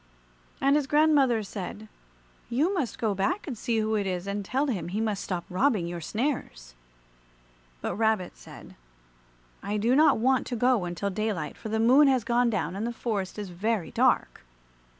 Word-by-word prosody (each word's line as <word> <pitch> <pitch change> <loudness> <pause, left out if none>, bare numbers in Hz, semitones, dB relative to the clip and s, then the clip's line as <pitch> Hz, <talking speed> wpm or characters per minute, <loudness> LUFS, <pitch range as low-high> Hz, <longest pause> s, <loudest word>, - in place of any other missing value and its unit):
And 275 +1 +3
his 295 -2 +1
grandmother 285 -6 +3
said, 205 +2 -7 0.6
"You 295 +11 +1
must 285 - -2
go 220 -3 0
back 200 - -1
and 270 - -5
see 230 +1 -1
who 220 0 0
it 205 -2 0
is, 180 -1 -3
and 200 +1 -3
tell 265 +8 0
him 195 - -2
he 195 +5 -3
must 215 -3 -1
stop 180 -3 -4
robbing 200 -1 +1
your 170 0 -5
snares." 210 - -3 1.1
But - - -3
Rabbit 220 -4 0
said, - - -13 0.9
"I 205 +2 -2
do 230 +5 +2
not 310 +2 +5
want 260 +3 +2
to 245 - -3
go 245 -4 +2
until 175 +3 -3
daylight, 205 -5 -3
for 220 - -8
the 220 +1 -1
Moon 260 +6 +6
has 260 -4 +2
gone 240 +1 +2
down 185 -5 -2
and 215 +4 -2
the - - -2
forest 215 -5 -3
is 205 -2 -5
very 205 +1 -2
dark." - - +1
220 Hz, 180 wpm, -27 LUFS, 195-255 Hz, 1.1 s, Moon